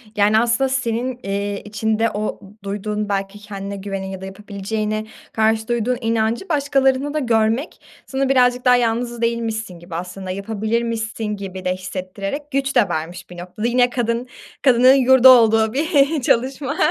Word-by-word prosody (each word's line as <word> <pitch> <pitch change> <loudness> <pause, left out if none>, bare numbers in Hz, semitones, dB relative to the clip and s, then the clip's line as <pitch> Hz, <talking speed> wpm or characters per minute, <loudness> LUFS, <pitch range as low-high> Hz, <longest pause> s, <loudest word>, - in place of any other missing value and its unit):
Yani, 210 +1 +4
aslında 240 +3 +2
senin, 250 -1 -2
iii, 200 +1 -3
içinde 220 +2 0
o 210 +1 -3 0.2
duyduğun 210 +1 -3
belki 195 +1 -3
kendine 200 -1 -7
güvene 195 -1 -5
ya 190 0 -7
da - - -6
yapabileceğine 210 +2 -4 0.3
karşı 220 0 +1
duyduğun 240 +1 0
inancı 225 - -1
başkalarında 280 -1 +1
da 305 - 0
görmek 230 +2 0 0.2
sana 270 0 -1
birazcık 250 -1 +3
daha 250 - +6
yalnız 235 0 -1
değilmişsin 225 -5 -2
gibi, 170 -1 -9
aslında 185 +2 -5
yapabilirmişsin 220 +3 -2
gibi 195 -3 -5
de 180 - +1
hissettirerek 195 +10 -6
güç 275 0 -1
de 235 -5 +4
vermiş 175 +3 -5
bir 175 - -11
noktada. 180 +6 -4
Yine 245 0 +3
kadın, 240 0 -2 0.3
kadının 255 0 +6
yurdu 260 -1 +6
olduğu 225 -2 +5
bir 295 -1 +2
çalışma. 265 +5 0
225 Hz, 150 wpm, -20 LUFS, 200-250 Hz, 0.3 s, daha